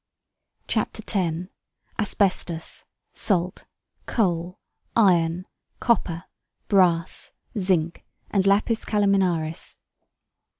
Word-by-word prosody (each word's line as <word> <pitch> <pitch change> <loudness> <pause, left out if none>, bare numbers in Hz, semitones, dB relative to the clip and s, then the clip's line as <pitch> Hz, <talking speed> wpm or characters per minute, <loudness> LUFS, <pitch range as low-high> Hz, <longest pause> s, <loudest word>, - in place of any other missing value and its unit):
CHAPTER - - -1
X. 180 -3 -1 0.5
ASBESTUS, 185 -5 -1 0.3
SALT, 180 -3 +1 0.4
COAL, 180 -5 0 0.4
IRON, 180 -4 +3 0.3
COPPER, 180 -7 +1 0.4
BRASS, 180 -4 +2 0.2
ZINC, 180 -5 +1 0.3
AND 195 -1 +2
LAPIS 215 +3 +3
CALAMINARIS. 190 -6 +1
185 Hz, 70 wpm, -25 LUFS, 170-200 Hz, 0.5 s, IRON